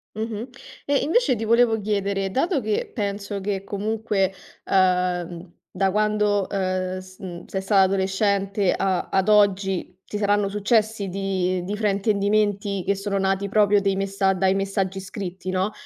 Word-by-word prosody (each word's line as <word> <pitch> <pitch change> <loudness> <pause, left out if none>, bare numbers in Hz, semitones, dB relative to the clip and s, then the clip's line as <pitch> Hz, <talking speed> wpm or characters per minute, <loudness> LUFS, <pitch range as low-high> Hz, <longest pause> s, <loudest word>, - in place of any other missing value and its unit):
Mh-mh. 220 +2 -4 0.4
E 285 0 +2
invece 320 - +2
ti 225 0 -4
volevo 230 0 +4
chiedere, 200 -2 -1
dato 285 - +1
che 215 -2 -1
penso 200 -1 -3
che 195 -1 -2
comunque, 205 -1 -1 0.3
ehm, 180 -2 0 0.2
da 190 0 +1
quando, 210 -1 +1
ehm, 185 -1 -1
s 185 0 -14
mhmm, 175 -2 -8
sei 190 - -4
stata 195 0 +3
adolescente 195 0 +1
a 190 -2 -1
ad 190 +2 +2
oggi, 195 -3 +2
ti 210 - -5
saranno 205 -1 +1
successi 210 0 +1
di 185 -1 -1
di 205 +3 -4
fraintendimenti 205 -1 +1
che 200 - +1
sono 195 0 -2
nati 195 +1 0
proprio 205 0 +4
dei 195 -1 +1
messa 195 0 +1
dai 190 0 +2
messaggi 195 -1 -1
scritti 190 -1 -6
no, 185 +3 0
195 Hz, 150 wpm, -23 LUFS, 190-210 Hz, 0.4 s, volevo